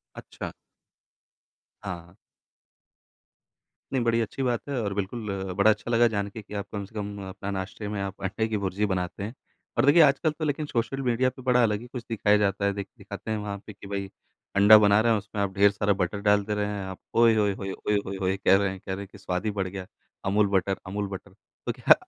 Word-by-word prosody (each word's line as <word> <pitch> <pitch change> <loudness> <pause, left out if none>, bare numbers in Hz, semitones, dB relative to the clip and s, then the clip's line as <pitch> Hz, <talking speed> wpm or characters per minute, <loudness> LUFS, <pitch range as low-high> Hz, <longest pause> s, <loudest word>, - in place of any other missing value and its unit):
अच्छा। - - -7 1.3
हाँ, 100 -2 -2
हाँ। 85 +2 -21 1.8
नहीं, 130 -2 +1
बड़ी 115 0 +3
अच्छी 115 +4 -3
बात 120 -3 +1
है 140 -3 -1
और 100 -2 -2
बिल्कुल 105 +2 -3 0.2
बड़ा 100 +3 +5
अच्छा 110 - -1
लगा 120 0 +5
जान 100 -2 -2
के 110 +2 -8
कि 105 - -11
आप 100 -1 -3
कम 100 -1 -3
से 100 - -16
कम 105 -1 -4
अपना 100 +1 -6
नाश्ते 100 +2 -4
में 105 -1 -3
आप 95 0 -6
अंडे 105 +4 0
की 110 - -1
भुर्जी 100 +1 0
बनाते 90 -1 -2
हैं। 110 +4 -5 0.4
और 120 - +4
देखिए 150 +4 +7
आजकल 145 +2 +4
तो 155 +1 -4
लेक़िन 150 0 -1
सोशल 125 +1 -1
मीडिया 125 0 +2
पे 130 - -13
बड़ा 125 -1 +4
अलग 105 -3 +2
ही 120 - -9
कुछ 125 -1 -7
दिखाया 105 -2 +3
जाता 100 -1 +1
है। 100 - +3
दिखाते 100 +2 -7
हैं 110 - 0
वहाँ 105 -1 -4
पे 105 - -8
कि 100 0 -13
भई, 100 -1 -4 0.5
अंडा 105 +2 +9
बना 105 0 +5
रहे 115 +1 +4
हैं, 110 - +3
उसमें 100 0 -4
आप 100 -1 -1
ढेर 100 0 +6
सारा 100 0 +1
बटर 95 +1 -1
डाल 105 0 +3
दे 105 +1 -2
रहे 105 0 0
हैं। 105 -1 -3
आप 95 -1 -7 0.2
ओए 115 -1 +6
होये 105 -2 +2
होये 95 0 -5
ओए 105 +2 -1
होये 95 0 -4
होये 95 0 +1
कह 95 - +5
रहे 100 0 +2
हैं, 95 - -6
कह 95 - -5
रहे - - -6
हैं - - -15
कि 105 - -12
स्वाद 90 0 -3
ही - - +2
बढ़ 95 - 0
गया, 95 0 -6 0.4
अमूल 105 +2 +3
बटर, 95 +1 +1
अमूल 100 +2 -3
बटर। 95 0 -8 0.3
तो - - +1
क्या - - +6
105 Hz, 235 wpm, -27 LUFS, 100-115 Hz, 1.8 s, अंडा